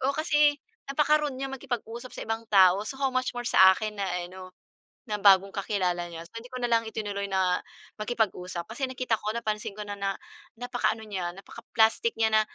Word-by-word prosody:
oo, 275 +2 0
kasi 300 -2 +3 0.3
napaka-rude 300 0 +2
niyang 270 +1 -4
makipag-usap 245 -2 -5
sa - - -6
ibang 225 0 -2
tao, 190 -2 +6
so 270 - -5
how 270 -1 0
much 255 -1 -1
more 245 - -3
sa 190 -5 +7
akin 215 -2 -4
na 195 - 0 0.2
ano, 185 +1 -10 0.6
na 210 -1 -1
bagong 195 -1 +6
kakilala 185 -4 -1
niya. 165 -1 -8
So, 230 - -15
hindi 240 - -12
ko - - -5
na 240 - 0
lang 230 0 +4
itinuloy 205 -2 -3
na 185 -2 +1 0.4
makipag-usap 190 -6 -1
kasi 245 +5 -3
nakita 255 -3 -1
ko, 210 +1 -2
napansin 215 -3 -3
ko 210 - -5
na 205 - -6
na 195 -1 -1 0.4
napaka-ano 245 -2 -1
niya, 185 -5 -4
napaka-plastic 225 - 0
niya 220 -1 +2
na, 215 - +6
220 Hz, 190 wpm, -27 LUFS, 195-255 Hz, 0.6 s, sa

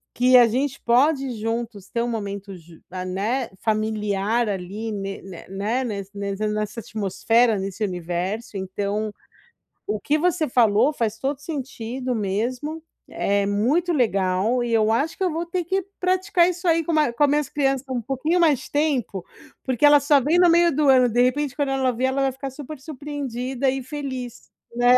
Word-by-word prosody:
que 250 +1 +6
a 240 - +7
gente 265 +4 -1
pode 270 +3 +2
juntos 225 -3 -4
ter 235 - -1
um - - -2
momento 200 -3 -5
ju 165 -2 -15
a 185 0 -4
né, 215 +7 -1 0.2
familiar 215 +1 0
ali, 200 +4 -4
ne 195 -1 -5
ne 190 -3 -10
né 210 +7 -1
nes 200 -5 -4
nesse 200 +1 -3
nessa 210 +1 -3
atmosfera, 220 +2 +1
nesse 195 +2 -4
universo. 185 +3 -3
Então 200 +3 -2 0.8
o 210 0 -1
que 295 +7 +1
você 330 -3 +1
falou 235 +2 +4
faz 225 -5 -2
todo 275 +1 -1
sentido 255 -4 -4
mesmo, 245 +10 -2 0.3
é 200 0 +1
muito 260 - +1
legal 215 - +1
e 240 - -3
eu 220 -1 +3
acho 280 +8 0
que - - -2
eu 365 - +1
vou 325 +2 -2
ter 350 +1 -2
que 380 +3 0 0.2
praticar 370 -1 +2
isso 355 +1 -4
aí 330 0 +3
com 330 - -2
ma 305 -5 +3
com 265 - +1
as 290 - +5
minhas 295 -1 +1
crianças, 270 -2 0
um 250 -2 -2
pouquinho 270 +9 0
mais 310 -6 +2
tempo, 275 - 0 0.4
porque 260 +2 +2
ela 290 0 +8
só 285 +1 +4
vem 310 +7 +2
no 355 -1 +6
meio 340 -2 +4
do 295 -1 +3
ano, 255 -2 +6
de 240 +2 +2
repente 270 +1 0
quando 285 -2 0
ela 265 -1 +1
ver, 250 +2 -1
ela 265 +1 0
vai 270 - +1
ficar 270 +1 -6
super 290 +2 -9
surpreendida 270 -3 -3
e 265 0 -2
feliz, 260 -3 -6 0.3
né. 245 +1 +5
245 Hz, 185 wpm, -23 LUFS, 210-290 Hz, 0.8 s, ela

